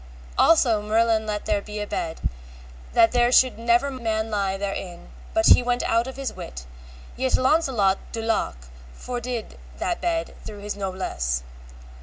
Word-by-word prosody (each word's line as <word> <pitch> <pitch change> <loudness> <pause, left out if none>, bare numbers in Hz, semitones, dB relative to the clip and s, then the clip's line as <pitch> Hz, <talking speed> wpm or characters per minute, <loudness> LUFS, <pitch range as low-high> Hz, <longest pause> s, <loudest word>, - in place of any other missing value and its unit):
Also 240 -10 +4
Merlin 220 +1 +2
let 210 -1 -3
make 205 -2 +1
there 210 0 -4
a - - -4
bed, 165 -5 -4 0.7
that 225 -1 +5
there 245 0 +3
should 255 -2 +4
never 235 +4 +2
man 225 -3 -2
lie 195 -2 0
therein 195 -3 -5 0.2
but 330 0 +3
he - - +8
went 245 0 0
out 230 +2 +1
of 265 - -7
his 275 -1 -4
wit, 65 +1 -8 0.5
yet 260 0 +1
Launcelot 255 -9 +2
de 225 - -4
Lake 140 - -1 0.3
fordid 245 - -5 0.2
that 345 - -2
bed 330 -1 -1
through 210 - -8
his 205 0 -4
noblesse. 185 - -2
225 Hz, 155 wpm, -24 LUFS, 200-250 Hz, 0.7 s, he